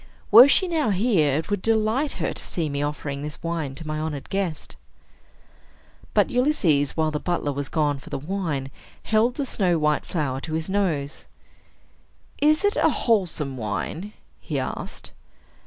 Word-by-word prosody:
Were 235 +5 +11
she 370 +6 +3
now 320 -8 +1
here, 185 - +2
it 160 +6 -4
would 205 -2 0
delight 225 +6 +1
her - - -2
to - - -6
see 165 -4 -2
me 140 0 -2
offering 145 -1 -3
this 150 +2 -7
wine 165 -5 -3
to 165 - -8
my 155 0 -3
honored 155 -3 -5
guest." 190 -6 -3 1.4
But - - +3
Ulysses, 195 - +2
while 155 -1 +1
the 150 - -2
butler 175 -4 -1
was 140 0 -4
gone 150 -3 0
for - - -13
the - - -3
wine, 150 -4 -3 0.3
held 225 +3 +2
the 285 - -2
snow 185 -8 +1
white 150 -1 +1
flower 135 -6 -2
to 160 - -6
his 160 +3 -2
nose. 160 -8 -1 1.2
"Is 305 +6 +4
it 410 - +2
a - - +4
wholesome 170 - 0
wine?" 120 - -4 0.3
he - - -4
asked. - - -5
165 Hz, 165 wpm, -24 LUFS, 145-215 Hz, 1.4 s, Were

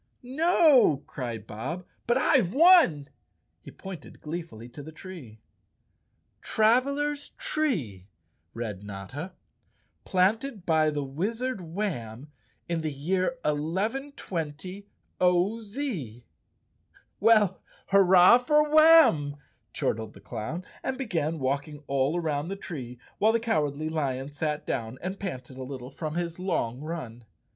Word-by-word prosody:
"No," 275 - +4
cried 120 -5 -6
Bob, 135 - -5 0.2
"but 240 +1 +3
I've 255 - +2
won!" 315 - +6 0.5
He - - -11
pointed 190 -6 -10
glee¬ 165 +3 -4
fully 115 -7 -12
to 145 - -10
the 155 +3 -9
tree. 155 - -11 0.5
" - - -46
Travelers' 280 +6 +2
Tree," 220 - -2 0.5
read 105 -4 -5
Notta, 105 - -7 0.3
" - - -43
planted 205 +3 0
by 160 -2 +3
the 145 -2 -2
Wiz¬ 200 - -3
ard 255 -7 -4
Warn 155 - -4 0.4
in 170 -1 -1
the 155 -1 -2
year 185 - -1
1120 185 - -3 0.3
0. 180 +5 +3
Z. 200 - -5 0.9
"W 225 +2 +7
ell, 195 -3 -2 0.3
hurrah 190 +3 +7
for 300 +4 +2
Warn!" 310 - +6 0.3
chortled 110 0 -2
the - - -12
clown, 130 +11 -6 0.2
and 265 - -3
began 165 - -1
walking 145 +2 -3
all 140 +4 +1
around 155 -2 -2
the 195 - -3
tree, 130 -11 -7 0.2
while 215 +2 +5
the 230 - +2
Cowardly 155 -9 -1
Lion 140 -3 -2
sat 150 +1 -3
down 115 +2 -3
and 190 +2 -4
panted 130 -9 -6
a - - -4
little 130 -1 -7
from 155 +2 -5
his 170 0 -3
long 150 -10 -1
run. 150 -8 -6
165 Hz, 130 wpm, -27 LUFS, 140-215 Hz, 0.9 s, W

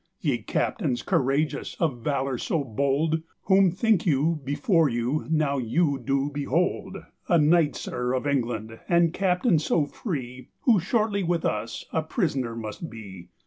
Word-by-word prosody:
"Ye - - 0
captaines 130 - -1
couragious, 140 +4 0
of 145 -8 0
valour 135 0 -1
so 160 -4 -1
bold, 140 +6 0 0.2
Whom 190 -1 +5
thinke 205 +3 +2
you 155 +2 +2
before 155 - +2
you 120 +5 -1
now 150 -3 +1
you 140 +4 +1
doe 135 +2 0
behold?" 170 +6 -1 0.3
"A 170 - +4
knight, 155 0 +4
sir, 125 +1 -3
of 130 - -2
England, 115 -5 -2
and 170 -1 +3
captaine 185 0 +2
soe 155 0 +1
free, 130 - -6
Who 230 -6 +4
shortlye 205 +2 0
with 170 -1 0
us 115 - -2
a 160 - +2
prisoner 145 - -1
must 115 +8 -6
bee." 95 -6 -10
145 Hz, 145 wpm, -26 LUFS, 130-170 Hz, 0.3 s, Whom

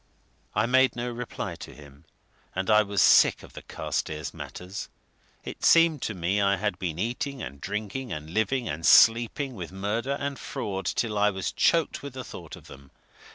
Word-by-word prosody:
I 105 +2 +2
made 130 +2 +3
no 120 0 -3
reply 120 0 -5
to - - -10
him 70 -1 -16 0.5
and 95 +3 0
I 105 0 +7
was 100 -3 +1
sick - - +5
of - - -14
the - - -9
Carstairs 75 -3 -4
matters; 95 +3 -7 0.5
it - - -8
seemed 165 -4 +5
to 105 - -3
me 95 +3 0
I 100 0 +3
had 105 -1 -2
been 85 -5 -3
eating 125 +6 -3
and 70 +2 -8
drinking 105 +5 -4
and 75 +1 -6
living 110 +5 0
and 80 +3 -4
sleeping 120 - +5
with 90 -7 -7
murder 110 +8 -2
and 140 -1 -3
fraud 95 -2 -4
till 105 -3 -1
I 105 0 +4
was 95 -2 -3
choked 165 -2 +1
with 140 -2 -8
the 130 0 -6
thought 85 -7 -9
of - - -16
them. 70 0 -14
105 Hz, 185 wpm, -27 LUFS, 90-125 Hz, 0.5 s, I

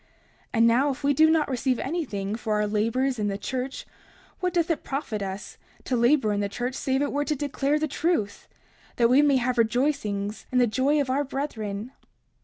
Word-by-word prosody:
30:34 - - -35 0.5
And 230 +1 +5
now, 255 +5 +3
if 275 +1 -5
we 285 +1 +3
do 315 +3 +5
not 320 -2 +3
receive 255 -1 0
anything 240 - -3
for 220 -1 -2
our 210 0 +1
labors 230 +5 0
in 210 - 0
the 200 -1 -2
church, 255 +5 -4 0.5
what 365 -1 0
doth 340 -1 +1
it 325 - -2
profit 270 -7 -3
us 195 0 -6 0.2
to 255 - -1
labor 240 -2 +3
in 205 - -1
the 200 0 -1
church 245 +5 -3
save 265 +1 0
it 285 - -1
were 290 +1 0
to 300 +1 -1
declare 285 +1 0
the 310 0 -1
truth, 290 - -1 0.5
that 235 0 +3
we 270 +3 +6
may 290 -2 +4
have 250 0 0
rejoicings 220 -4 0
in 255 - +1
the 250 - +5
joy 270 +6 +1
of 270 -3 0
our 280 +2 +1
brethren? 230 -6 -4
255 Hz, 210 wpm, -26 LUFS, 215-285 Hz, 0.5 s, we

